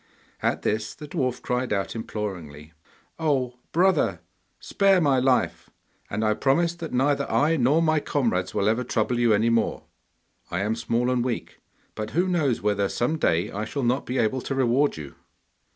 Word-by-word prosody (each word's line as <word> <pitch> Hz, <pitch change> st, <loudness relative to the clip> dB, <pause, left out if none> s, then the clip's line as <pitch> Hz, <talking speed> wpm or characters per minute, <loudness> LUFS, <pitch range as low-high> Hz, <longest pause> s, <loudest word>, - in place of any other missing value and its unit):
At -, -, 0 dB
this 110 Hz, +1 st, -1 dB
the 150 Hz, -, -9 dB
dwarf 130 Hz, -4 st, -2 dB
cried 125 Hz, -1 st, -1 dB
out 100 Hz, +1 st, -1 dB
imploringly, 85 Hz, -9 st, -6 dB, 0.5 s
'Oh, 130 Hz, -6 st, 0 dB
brother! 185 Hz, +3 st, +2 dB, 0.4 s
spare 195 Hz, -2 st, +3 dB
my 140 Hz, -5 st, +3 dB
life, 130 Hz, 0 st, +1 dB, 0.4 s
and 110 Hz, +3 st, -1 dB
I 110 Hz, -, +3 dB
promise 165 Hz, +9 st, +1 dB
that 170 Hz, -2 st, -7 dB
neither 140 Hz, +2 st, +1 dB
I 155 Hz, +3 st, +2 dB
nor 145 Hz, +4 st, +3 dB
my 155 Hz, -1 st, +3 dB
comrades 115 Hz, -12 st, -1 dB
will 100 Hz, -, 0 dB
ever 115 Hz, +3 st, +1 dB
trouble 120 Hz, 0 st, 0 dB
you 120 Hz, -2 st, +3 dB
any 110 Hz, +2 st, +3 dB
more. 115 Hz, -1 st, 0 dB, 0.7 s
I 90 Hz, -, -2 dB
am 105 Hz, +2 st, 0 dB
small 115 Hz, +2 st, 0 dB
and 125 Hz, -1 st, +1 dB
weak, 120 Hz, -2 st, -4 dB, 0.3 s
but 110 Hz, 0 st, -5 dB
who 180 Hz, +2 st, +3 dB
knows 155 Hz, -, 0 dB
whether 100 Hz, -1 st, +1 dB
some 155 Hz, +7 st, -1 dB
day 85 Hz, -, +1 dB
I 105 Hz, +2 st, -3 dB
shall 135 Hz, +5 st, -3 dB
not 125 Hz, +3 st, 0 dB
be 125 Hz, -, -2 dB
able 125 Hz, +3 st, +1 dB
to 135 Hz, -, -3 dB
reward 135 Hz, -, +2 dB
you. 75 Hz, -3 st, -8 dB
125 Hz, 175 wpm, -25 LUFS, 110-145 Hz, 0.7 s, spare